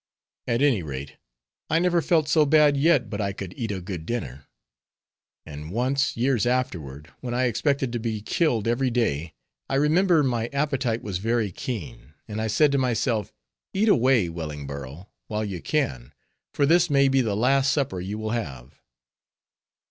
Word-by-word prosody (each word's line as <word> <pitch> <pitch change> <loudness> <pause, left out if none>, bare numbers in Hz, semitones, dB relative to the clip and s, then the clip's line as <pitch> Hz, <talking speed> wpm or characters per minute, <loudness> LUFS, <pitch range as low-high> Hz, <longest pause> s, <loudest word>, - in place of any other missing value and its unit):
At 120 +3 +1
any 130 -9 +3
rate, 70 -3 -7 0.5
I 160 - +3
never 175 0 +2
felt 160 -2 +2
so 155 0 +4
bad 150 -1 +5
yet 140 -4 +3
but 105 0 -4
I 100 -1 -1
could 95 -2 -7
eat 115 -2 -4
a 95 - -3
good 90 -3 -6
dinner. 70 - -5 1.0
And 75 0 -8
once, 130 +7 0
years 120 -2 +1
afterward, 80 - -3
when 120 -1 -4
I 130 - +1
expected 135 +1 0
to 120 - -1
be 110 -1 -2
killed 120 -7 +1
every 125 +3 +1
day, 85 - -1 0.3
I 135 - 0
remember 160 +3 +3
my 120 -4 0
appetite 135 -4 -1
was 95 -3 -3
very 115 -1 0
keen, 115 - -7
and 110 0 -4
I 110 - -1
said 145 +7 +3
to 140 - +2
myself, 120 -3 0 0.4
"Eat 215 +3 +3
away, 125 - +4
Wellingborough, 75 -1 -7 0.2
while 105 0 -2
you 95 -5 -5
can, 65 -1 -2 0.4
for 140 - +1
this 170 +3 +4
may 140 -1 +4
be 135 0 +3
the 110 -5 -1
last 135 +4 +3
supper 130 -10 -1
you 95 +4 -4
will 110 0 -3
have." 70 - -5
115 Hz, 170 wpm, -25 LUFS, 95-140 Hz, 1.0 s, bad